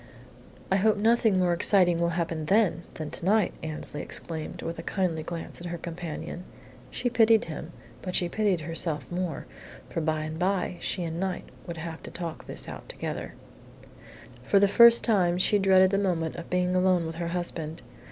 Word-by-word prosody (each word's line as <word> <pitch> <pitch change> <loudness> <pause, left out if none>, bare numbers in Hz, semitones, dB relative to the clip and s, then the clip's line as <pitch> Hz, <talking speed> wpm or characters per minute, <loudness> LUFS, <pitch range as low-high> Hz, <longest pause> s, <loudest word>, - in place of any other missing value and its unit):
"I 190 - +4
hope 215 +2 +3
nothing 220 -1 +3
more 180 -1 +3
exciting 175 -1 +4
will 170 0 0
happen 165 -2 -2
then 195 -2 +2
than 155 -2 -5
to - - -7
night!" 205 +1 +3
Annesley 155 -1 -2
exclaimed, 160 -2 -5
with 165 0 -4
a - - -3
kindly 175 -3 -1
glance 165 +1 -7
at 175 - -5
her 175 0 -4
companion. 170 0 -6 0.5
She - - -3
pitied 225 -2 +4
him, 160 0 -7 0.3
but 185 -1 -4
she 175 - +2
pitied 195 -2 0
herself 165 -1 -2
more, 175 -3 -3 0.5
for 165 - -2
by 155 -1 0
and 155 +1 -5
by 185 -1 0
she 180 - -2
and 165 0 -4
Knight 190 -1 -2 0.2
would 170 -1 -5
have 160 0 -6
to - - -8
talk 170 -2 -7
this - - -4
thing - - -6
out - - -12
together. - - -5 1.1
For 200 - +3
the 200 - +5
first 235 +3 +7
time 180 -6 +2
she 205 +3 +3
dreaded 190 -1 +5
the 195 - +2
moment 170 -5 -1
of 170 - -8
being 180 0 +1
alone 185 -2 +3
with 160 0 -5
her 170 0 -3
husband. 170 -3 -2
175 Hz, 190 wpm, -27 LUFS, 165-195 Hz, 1.1 s, first